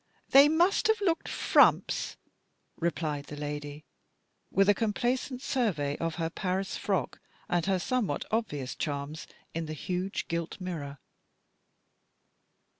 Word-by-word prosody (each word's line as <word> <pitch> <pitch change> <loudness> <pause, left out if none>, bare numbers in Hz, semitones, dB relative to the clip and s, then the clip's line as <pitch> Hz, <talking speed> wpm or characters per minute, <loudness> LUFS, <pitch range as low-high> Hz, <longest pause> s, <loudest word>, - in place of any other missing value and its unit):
They 280 +2 +8
must 345 +5 +3
have 440 0 +3
looked 350 -5 0
frumps," - - +3 0.6
replied 155 -4 -2
the 150 - -8
lady, 145 0 -5 0.6
with 195 +1 +3
a 205 - +7
complacent 245 +5 -1
survey 170 - 0
of 165 -1 -2
her 165 -1 -2
Paris 190 +1 -2
frock 195 -3 -1 0.3
and 175 -1 0
her 190 -1 +3
somewhat 200 - -1
obvious 150 - -1
charms 145 +1 -4 0.3
in 165 -1 -3
the 155 - -4
huge 180 +4 -3
gilt 170 +2 -3
mirror. 155 -7 -5
175 Hz, 120 wpm, -29 LUFS, 150-225 Hz, 0.6 s, They